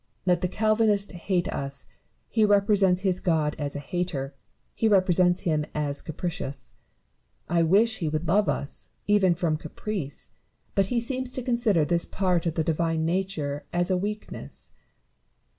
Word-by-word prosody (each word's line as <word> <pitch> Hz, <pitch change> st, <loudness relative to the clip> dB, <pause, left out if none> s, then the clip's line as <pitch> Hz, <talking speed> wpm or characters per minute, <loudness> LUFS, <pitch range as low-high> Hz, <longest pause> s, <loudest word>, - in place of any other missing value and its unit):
Let 180 Hz, -2 st, +3 dB
the 180 Hz, -, +1 dB
Calvinist 215 Hz, 0 st, +2 dB
hate 180 Hz, 0 st, -1 dB
us: 140 Hz, 0 st, -4 dB, 0.4 s
he 220 Hz, -, +1 dB
represents 200 Hz, -3 st, +4 dB
his 185 Hz, -2 st, 0 dB
God 155 Hz, -4 st, +1 dB
as 145 Hz, -1 st, -2 dB
a -, -, -2 dB
hater, 145 Hz, -3 st, -3 dB, 0.4 s
he 225 Hz, -, +1 dB
represents 185 Hz, -3 st, +3 dB
him 155 Hz, -3 st, +1 dB
as 145 Hz, -2 st, -2 dB
capricious. 155 Hz, -4 st, -5 dB, 0.7 s
I 170 Hz, 0 st, +2 dB
wish 210 Hz, +7 st, +3 dB
he 165 Hz, -4 st, -1 dB
would 155 Hz, +2 st, -2 dB
love 205 Hz, +6 st, +3 dB
us, 140 Hz, -, -4 dB, 0.2 s
even 195 Hz, -4 st, +4 dB
from 165 Hz, -2 st, 0 dB
caprice; 155 Hz, -1 st, -6 dB, 0.4 s
but 195 Hz, -1 st, +2 dB
he 240 Hz, +2 st, +1 dB
seems 255 Hz, +1 st, -3 dB
to 255 Hz, -, -3 dB
consider 235 Hz, -, +2 dB
this 170 Hz, +2 st, +1 dB
part 180 Hz, -3 st, 0 dB
of 165 Hz, -, -1 dB
the 160 Hz, -, +1 dB
Divine 165 Hz, 0 st, 0 dB
nature 165 Hz, -5 st, -1 dB
as 175 Hz, +2 st, +1 dB
a -, -, +3 dB
weakness. 210 Hz, +3 st, -6 dB
180 Hz, 155 wpm, -26 LUFS, 160-205 Hz, 0.7 s, represents